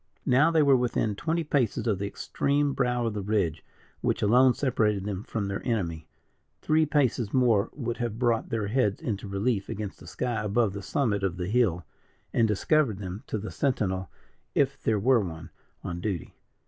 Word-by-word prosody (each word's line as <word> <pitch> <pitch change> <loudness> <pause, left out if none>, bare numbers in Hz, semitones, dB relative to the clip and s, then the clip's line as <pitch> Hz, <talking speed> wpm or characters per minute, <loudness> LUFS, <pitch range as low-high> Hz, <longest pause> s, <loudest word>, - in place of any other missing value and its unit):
Now 135 +6 +5
they 160 -2 +4
were 140 -2 +6
within 120 -3 0
twenty 165 +10 -1
paces 135 -8 0
of 105 -5 +1
the 100 - -2
extreme 140 +7 0
brow 125 -2 0
of 115 - -1
the 105 - -3
ridge, 95 -6 0 0.4
which - - 0
alone 125 +4 +5
separated 105 -7 +1
them 100 -2 -3
from 105 -1 -3
their 100 0 -3
enemy 85 -10 -2 0.5
three 155 0 +2
paces 130 -7 +1
more 120 -6 +3
would 120 -4 -3
have 120 -3 -3
brought 120 -2 +1
their 110 -2 -1
heads 105 -4 +1
into 105 -2 -4
relief 100 +1 -1
against 105 -1 -5
the - - -13
sky 120 -3 -2
above 105 0 +1
the 100 - -5
summit 105 -3 0
of 95 -2 -1
the 90 0 -3
hill, 100 -8 +1 0.5
and 115 -2 +3
discovered 110 +2 +2
them 95 +1 -6
to - - -2
the 110 +1 -6
sentinel, 95 - -1 0.5
if 140 -1 +1
there 110 - +1
were 120 +4 +4
one, 80 -4 -6 0.3
on 85 -1 -4
duty. 95 -5 -3
110 Hz, 185 wpm, -27 LUFS, 100-125 Hz, 0.5 s, were